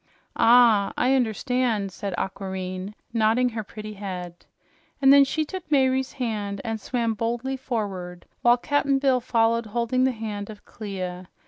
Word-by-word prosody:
"Ah, 230 Hz, -4 st, +5 dB
I 260 Hz, -, +3 dB
understand," 240 Hz, -4 st, 0 dB
said 195 Hz, -1 st, -5 dB
Aquareine, 190 Hz, +1 st, -4 dB, 0.2 s
nodding 230 Hz, +2 st, +3 dB
her 220 Hz, -2 st, -4 dB
pretty 215 Hz, +1 st, -8 dB
head. 180 Hz, -4 st, -7 dB, 0.5 s
And 275 Hz, -1 st, +7 dB
then 280 Hz, 0 st, +8 dB
she 310 Hz, +3 st, -1 dB
took 370 Hz, +2 st, -8 dB
Mayre's 265 Hz, -2 st, +2 dB
hand 210 Hz, -6 st, -3 dB
and 225 Hz, -2 st, -3 dB
swam 235 Hz, -1 st, -1 dB
boldly 235 Hz, +4 st, -2 dB
forward, 195 Hz, -9 st, -4 dB, 0.2 s
while 240 Hz, 0 st, +5 dB
Cap'n 280 Hz, +1 st, +1 dB
Bill 270 Hz, -2 st, +2 dB
followed 230 Hz, -1 st, +1 dB
holding 235 Hz, +3 st, 0 dB
the 260 Hz, -, +3 dB
hand 215 Hz, -3 st, -5 dB
of 210 Hz, -1 st, -11 dB
Clia. 185 Hz, -3 st, -6 dB
225 Hz, 145 wpm, -25 LUFS, 200-255 Hz, 0.5 s, then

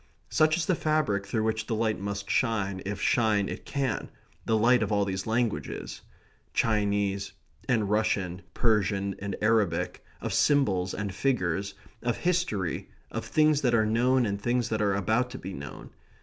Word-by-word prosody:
Such 155 Hz, +1 st, +4 dB
is 165 Hz, -, 0 dB
the 185 Hz, -, +2 dB
fabric 155 Hz, -, 0 dB
through 110 Hz, +2 st, 0 dB
which 110 Hz, 0 st, -1 dB
the 115 Hz, -, -1 dB
light 110 Hz, -2 st, 0 dB
must 100 Hz, 0 st, -4 dB
shine, 100 Hz, -6 st, 0 dB
if 100 Hz, 0 st, -3 dB
shine 110 Hz, -6 st, +2 dB
it -, -, -6 dB
can 135 Hz, -5 st, -2 dB, 0.4 s
the 110 Hz, -, +2 dB
light 120 Hz, +3 st, +4 dB
of -, -, -1 dB
all 100 Hz, -1 st, +2 dB
these 95 Hz, +1 st, -3 dB
languages, 115 Hz, 0 st, -2 dB, 0.5 s
Chinese 100 Hz, -2 st, +1 dB, 0.4 s
and 110 Hz, -5 st, +2 dB
Russian, 100 Hz, -3 st, 0 dB
Persian 100 Hz, -3 st, +1 dB
and 100 Hz, 0 st, -3 dB
Arabic, 110 Hz, -6 st, +1 dB, 0.2 s
of -, -, -3 dB
symbols 95 Hz, -11 st, +2 dB
and 100 Hz, -1 st, -3 dB
figures, 100 Hz, -6 st, 0 dB, 0.3 s
of 120 Hz, -1 st, -1 dB
history, 170 Hz, -, -1 dB, 0.2 s
of -, -, -4 dB
things 155 Hz, -1 st, +3 dB
that 125 Hz, -4 st, +3 dB
are 110 Hz, -1 st, +3 dB
known 120 Hz, +3 st, +3 dB
and 100 Hz, -1 st, -2 dB
things 120 Hz, +1 st, 0 dB
that 110 Hz, -1 st, -1 dB
are 100 Hz, -2 st, +2 dB
about 110 Hz, +5 st, +1 dB
to 130 Hz, -, -7 dB
be 95 Hz, -3 st, -7 dB
known. 70 Hz, -4 st, -8 dB
110 Hz, 165 wpm, -28 LUFS, 100-120 Hz, 0.5 s, Such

